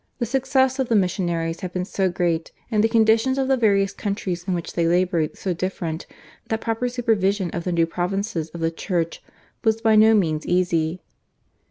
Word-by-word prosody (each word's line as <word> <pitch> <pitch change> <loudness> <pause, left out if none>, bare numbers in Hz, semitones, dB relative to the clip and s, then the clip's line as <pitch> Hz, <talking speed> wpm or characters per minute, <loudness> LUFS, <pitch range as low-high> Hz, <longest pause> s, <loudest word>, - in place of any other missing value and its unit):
The 240 - -1
success 265 +1 +1
of 260 - 0
the 230 - +3
missionaries 175 -4 0
had 185 -1 -6
been 180 0 -2
so 190 -1 0
great, 170 -2 -1 0.2
and 215 -1 +2
the 225 - +3
conditions 225 +3 +3
of 265 -1 +1
the 265 - +3
various 200 -5 +2
countries 195 -4 -3
in 185 - 0
which 170 - -5
they 170 -1 +1
laboured 175 -2 +1
so 185 - -2
different, 170 -2 -4 0.4
that 220 - -1
proper 225 +2 -1
supervision 205 -6 0
of 170 - -4
the 180 - -1
new 170 -1 +3
provinces 180 0 -2
of 170 +1 -9
the 165 0 +1
Church 170 -1 -2 0.4
was 220 -1 +2
by 225 -1 +3
no 220 +1 +6
means 160 -6 +1
easy. 175 -1 0
190 Hz, 190 wpm, -23 LUFS, 170-225 Hz, 0.4 s, no